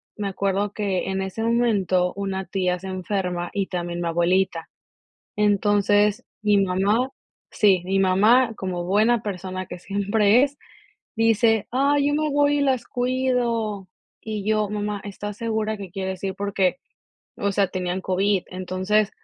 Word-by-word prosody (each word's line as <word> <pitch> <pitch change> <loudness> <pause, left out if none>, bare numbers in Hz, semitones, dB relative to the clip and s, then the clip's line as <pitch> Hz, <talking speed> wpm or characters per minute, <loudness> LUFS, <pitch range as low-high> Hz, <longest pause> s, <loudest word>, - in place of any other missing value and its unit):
me 205 -2 -3
acuerdo 195 +1 -1
que 195 -3 -2
en 190 0 -1
ese 190 +4 -5
momento, 200 -6 +1
una 195 -1 -3
tía 180 -2 -1
se 190 - -11
enferma 185 -2 -3
y 200 -2 0
también 175 -1 -4
mi 170 - -1
abuelita. 175 0 +1 0.7
Entonces, 205 0 +2 0.2
mi 210 -1 +3
mamá 200 +7 +1 0.4
Sí. 195 -5 +3
Mi 195 +1 0
mamá 220 +6 +4
como 185 -3 -4
buena 215 +5 +3
persona 185 -2 -5
que - - -8
siempre 205 +5 +2
es, 285 0 -2 0.6
dice: 225 -1 +3
"Ay, 280 +3 +2
yo - - 0
me 305 0 0
voy 290 0 +2
y - - +1
las 265 -3 +1
cuido". 245 -5 -1 0.3
Y 215 -2 -4
yo: 215 -1 +1
"Mamá, 210 -1 -3
¿estás 205 0 -6
segura 220 -1 -1
que 195 -2 -8
quieres 190 -1 -4
ir?". 190 - -2
Porque, 195 -2 0 0.6
o 200 - -1
sea, 195 -1 +2
tenían 180 0 -3
COVID. 190 +1 +1
Entonces, 185 +3 0
200 Hz, 150 wpm, -23 LUFS, 185-220 Hz, 0.7 s, mamá